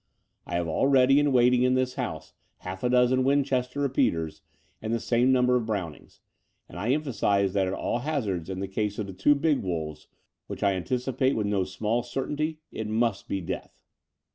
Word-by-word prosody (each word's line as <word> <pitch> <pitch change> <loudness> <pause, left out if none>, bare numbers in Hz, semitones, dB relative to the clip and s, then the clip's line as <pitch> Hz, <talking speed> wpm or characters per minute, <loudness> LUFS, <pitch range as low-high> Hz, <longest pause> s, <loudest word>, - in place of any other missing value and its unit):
I 85 - -3
have 85 -1 0
all 80 +11 +1
ready 135 0 +5
and 145 -1 +2
waiting 125 -1 +4
in 125 0 +3
this 130 0 0
house - - -5 0.3
half 95 +1 -6
a 125 - +2
dozen 125 +1 +3
Winchester 135 -1 +1
repeaters 85 - 0 0.4
and 110 - -3
the 115 - +1
same 120 +3 +2
number 125 -1 +3
of 120 -3 0
Brownings; 95 -8 -5 0.5
and 90 - -9
I 105 +6 -2
emphasize 105 -9 +1
that 95 -2 +1
at 95 - -2
all 120 - -2
hazards 110 - -2
in 95 0 -4
the 100 - -2
case 105 +1 -2
of 105 - -2
the 95 - -8
two 100 +11 +3
big 145 0 +1
wolves, 80 -5 -4 0.4
which - - -6
I 100 -1 +3
anticipate 130 +6 0
with 110 - 0
no 100 -2 +1
small 110 +5 -1
certainty, 150 +5 -3
it 110 - -4
must 115 +2 0
be 95 - -2
death. 85 - -7
120 Hz, 190 wpm, -27 LUFS, 95-130 Hz, 0.5 s, ready